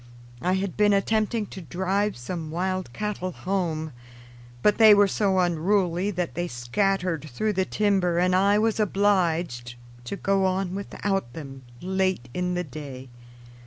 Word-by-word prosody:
I 180 +2 +1
had 190 -1 -2
been 210 -1 +4
attempting 215 +2 +1
to 190 - -7
drive 190 +4 -1
some 160 +6 -5
wild 185 -1 -2
cattle 195 - -3
home, 170 -6 -2 0.7
but 210 - +3
they 215 -2 +9
were 205 0 +5
so 195 -1 +1
unruly 180 +1 +1
that 180 -3 -3
they 175 +1 -2
scattered 165 +5 -1
through 210 - -1
the 190 -1 +1
timber 190 -4 +1
and 180 +1 +3
I 200 +2 +4
was 220 +1 +1
obliged 175 - +1 0.3
to 160 - -4
go 195 -1 +1
on 185 -1 0
without 195 -7 -3
them 135 -3 -8 0.2
late 185 -8 0
in 180 0 -1
the 180 - -1
day. 135 -4 -9
185 Hz, 150 wpm, -25 LUFS, 165-200 Hz, 0.7 s, they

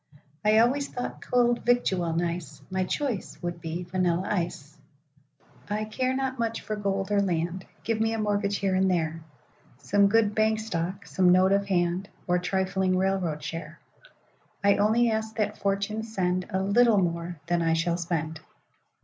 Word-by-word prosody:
I 215 +1 +4
always 265 +5 +3
thought 245 - -5
cold 240 -1 +2
victual 190 -8 +2
nice;—My 175 +2 -3
choice 250 -1 -3
would 175 -1 -4
be 165 +2 -4
vanilla 180 0 0
ice.I 150 +3 -6
care 255 +4 -1
not 265 -1 -2
much 230 -1 -1
for 215 - -4
gold 195 -1 -2
or 205 -1 +3
land;—Give 185 +5 -2
me 225 0 +2
a 225 - -1
mortgage 205 -1 0
here 195 -1 0
and 190 0 +3
there,—Some 165 +4 -1
good 215 0 +3
bank 220 0 +2
stock, 190 -2 -3
some 180 -1 +3
note 185 +1 +5
of 200 0 +2
hand, 180 0 0 0.2
Or 180 0 +2
trifling 190 0 0
railroad 185 -5 0
share,—I 200 - -4
only 225 +3 +3
ask 220 0 -2
that 210 -1 -1
Fortune 200 +2 -1
sendA 190 -3 -1
little 225 +2 +4
more 170 -2 -1
than 175 +1 +1
I 165 -1 +2
shall 170 +1 +1
spend. 160 -2 -3
190 Hz, 145 wpm, -27 LUFS, 175-215 Hz, 0.2 s, note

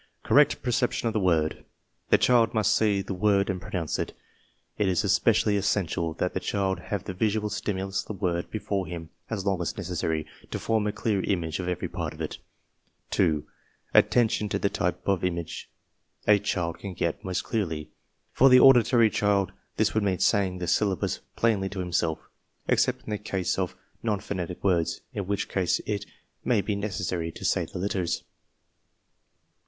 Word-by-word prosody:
Correct - - +4
'perception 125 -1 0
of 115 - 0
the 110 - +1
word. 80 -5 +1 0.5
The - - +6
child 120 -3 +3
must 110 -1 +3
see 100 -3 +2
the 95 - -4
word 100 +1 +2
and 90 -1 -5
pronounce 85 -3 -3
it. - - -3 0.7
It 105 - +2
is 95 +2 +2
especially 105 +1 +3
essential 90 -5 0
that 90 - -1
the - - -1
child 95 0 -1
have 100 -3 -4
the - - -5
visual 105 +2 0
stimulus 95 -1 -2
of - - -16
the - - -4
word 90 -3 -2
be - - -3
fore 100 -3 -2
him 85 -2 -7 0.2
as 100 -4 -3
long 95 -3 +1
as 85 - -3
necessary 85 -4 -2 0.2
to - - -3
form 110 -2 0
a - - +1
clear 105 -2 0
image 85 -4 -1
of 90 - -3
every 90 -1 -2
part - - -4
of - - -15
it. - - -4 0.7
2. 75 -2 +2 0.5
Attention 115 -3 +3
to - - 0
the 100 - +1
type 90 +1 -2
of 95 -3 +1
image 85 -2 -3 0.6
a 105 -1 +6
child 85 -4 -2
can 95 -1 -6
get 85 +4 -2
most 95 -2 -2
clearly. 80 -9 -2 0.4
For 135 - +5
the 125 0 +8
auditory 120 -3 +6
child, 100 -2 +1 0.3
this - - +2
would 110 - +2
mean 95 -3 +1
saying 95 -3 +2
the 90 - -3
syllables 95 0 +1 0.2
plainly 105 -4 +1
to 100 - -6
himself, 85 -3 0 0.5
except - - +2
in - - -7
the 105 - -1
case 95 -4 -1
of - - -2 0.3
non 105 -3 0
phonetic 90 -3 -5
words, 90 -4 +1
in 100 -3 -4
which 100 0 -1
case 90 -3 +1
it 105 -1 -3 0.4
may 115 -5 +2
be 100 +2 -2
necessary 95 -5 -2
to - - -7
say - - +2
the - - -8
letters. 90 -2 -1
95 Hz, 180 wpm, -27 LUFS, 90-105 Hz, 0.7 s, the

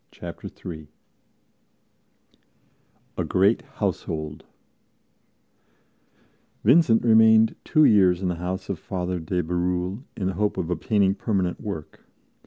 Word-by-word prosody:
Chapter - - -9
3 80 -3 -9 2.3
A - - +1
GREAT 100 +5 +2
HOUSEHOLD 75 -2 -4 2.2
VINCENT 125 -2 +4
remained 110 -1 +5
two 155 -1 +4
years 95 -5 +4
in - - 0
the 90 -1 -2
house 90 +1 -4
of - - -3
Father 90 -1 -4
de 90 +2 -2
Bérulle, 90 +4 -2 0.2
in 95 - -3
the 95 - -1
hope 105 +3 -1
of 90 -2 -3
obtaining 95 +3 +1
permanent 95 -4 -2
work. 90 -8 -7
95 Hz, 110 wpm, -24 LUFS, 90-105 Hz, 2.3 s, remained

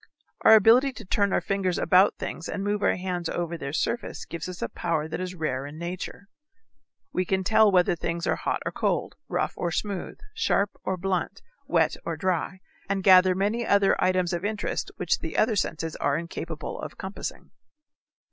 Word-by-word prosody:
Our 220 - +9
ability 240 +6 +5
to 220 - -10
turn 200 +1 +1
our - - +2
fingers 195 -3 -1
about 190 +2 +4
things 165 - -5
and 195 - -3
move 205 0 -1
our - - +3
hands 180 -2 -3
over 170 -1 -2
their 140 -4 -5
surface 235 +10 -2
gives 170 +1 -6
us 180 - -6
a - - 0
power 160 -3 -2
that 160 - -4
is 185 0 -4
rare 140 -5 -2
in 145 +2 -10
nature. 180 +3 -6 0.9
We 185 - +1
can 190 +1 0
tell 215 +1 +5
whether 180 -2 +3
things 170 0 -3
are - - +1
hot - - -2
or - - -1
cold, - - -1 0.2
rough - - -1
or 175 - -2
smooth, 195 +2 -3 0.2
sharp 205 - +1
or 190 - -1
blunt, 185 0 -2 0.2
wet - - +2
or - - -3
dry, 185 0 -1 0.3
and 195 -1 0
gather 185 -1 +7
many 210 +5 0
other 200 -3 +4
items 185 -1 +2
of 175 +1 -2
interest 210 0 -2
which - - 0
the - - -5
other 220 0 +3
senses 165 -4 -2
are 140 0 +1
incapable 165 -1 -5
of - - -7
compassing. 190 +1 -6
185 Hz, 185 wpm, -26 LUFS, 170-200 Hz, 0.9 s, Our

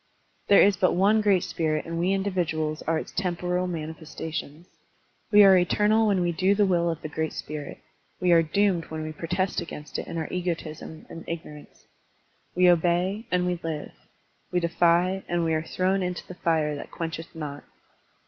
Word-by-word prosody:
There 200 - +7
is 200 -2 +4
but 185 - +2
one 205 +4 +4
great 200 -4 +3
spirit 155 -2 -1
and 165 0 -4
we 180 +3 +1
individuals 175 -6 -1
are 165 0 +2
its - - -6
temporal 180 0 -1
manifestations. 160 -1 -6 0.7
We 210 -1 +8
are 195 -1 +8
eternal 210 +5 +3
when 195 -3 +2
we 175 0 +1
do 190 +4 +2
the 205 0 +3
will 170 -2 +2
of 165 -1 -4
the - - -3
great 160 +1 -3
spirit; 150 -1 -6 0.4
we 180 -1 +2
are 165 -1 +7
doomed 180 +1 +1
when 155 0 -6
we 155 - -4
protest 180 +4 -2
against 150 -2 -7
it - - -6
in - - -5
our 160 - -2
egotism 165 -3 -4
and 165 - -9
ignorance. 150 -3 -8 0.7
We 180 0 +5
obey, 180 +5 +2
and 180 0 +1
we 180 -1 -1
live. 160 -2 -4 0.6
We 180 - +2
defy, 175 +2 +2
and 175 -1 0
we 160 - +1
are 155 - +1
thrown 185 +4 0
into 180 -1 -3
the - - -8
fire 160 -4 0
that 145 - -8
quench 165 -1 -4
eth 165 +1 -11
not. 145 -2 -6
175 Hz, 185 wpm, -26 LUFS, 160-185 Hz, 0.7 s, We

